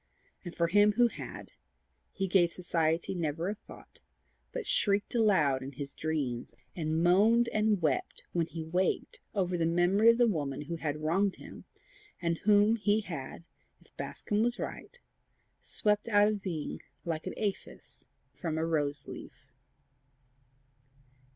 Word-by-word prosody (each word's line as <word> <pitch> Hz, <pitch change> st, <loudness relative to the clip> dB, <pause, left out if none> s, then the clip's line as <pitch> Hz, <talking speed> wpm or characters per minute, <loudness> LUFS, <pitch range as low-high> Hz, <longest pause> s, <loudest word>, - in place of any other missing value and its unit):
And 175 Hz, -2 st, -8 dB
for 170 Hz, -, +2 dB
him 205 Hz, +4 st, +4 dB
who 240 Hz, +2 st, +4 dB
had, -, -, -9 dB, 0.6 s
he 195 Hz, -, -2 dB
gave 175 Hz, -2 st, +4 dB
society 165 Hz, -2 st, 0 dB
never 165 Hz, 0 st, -2 dB
a -, -, -1 dB
thought, 215 Hz, -, -15 dB, 0.5 s
but -, -, -4 dB
shrieked 205 Hz, -1 st, +1 dB
aloud 185 Hz, -, +3 dB
in 135 Hz, +2 st, -7 dB
his 140 Hz, +1 st, -6 dB
dreams, 135 Hz, -7 st, -3 dB, 0.2 s
and 160 Hz, -1 st, -1 dB
moaned 220 Hz, +7 st, +4 dB
and 215 Hz, -4 st, +1 dB
wept 145 Hz, -5 st, -1 dB
when 170 Hz, -2 st, +1 dB
he 165 Hz, -1 st, -6 dB
waked 180 Hz, +4 st, -1 dB, 0.2 s
over 180 Hz, -3 st, 0 dB
the 165 Hz, -, +2 dB
memory 175 Hz, +6 st, +4 dB
of 230 Hz, -, +5 dB
the 240 Hz, -, +5 dB
woman 145 Hz, -, -1 dB
who 165 Hz, +3 st, -5 dB
had 150 Hz, -2 st, -2 dB
wronged 190 Hz, +5 st, +1 dB
him, -, -, -12 dB, 0.5 s
and 170 Hz, -1 st, -1 dB
whom 210 Hz, +2 st, +4 dB
he 210 Hz, 0 st, +2 dB
had, 165 Hz, -5 st, -7 dB, 0.4 s
if -, -, -26 dB
Bascombe 210 Hz, 0 st, -2 dB
was 240 Hz, +1 st, +1 dB
right, 485 Hz, -, -7 dB, 0.6 s
swept 210 Hz, 0 st, 0 dB
out 205 Hz, -1 st, +5 dB
of 210 Hz, -1 st, -1 dB
being 170 Hz, -6 st, -4 dB, 0.2 s
like 160 Hz, -2 st, -3 dB
an -, -, -4 dB
aphis 205 Hz, -3 st, -5 dB, 0.3 s
from 160 Hz, -3 st, -3 dB
a 160 Hz, -, 0 dB
rose 150 Hz, -3 st, -1 dB
leaf. -, -, -11 dB
175 Hz, 150 wpm, -31 LUFS, 160-205 Hz, 0.6 s, of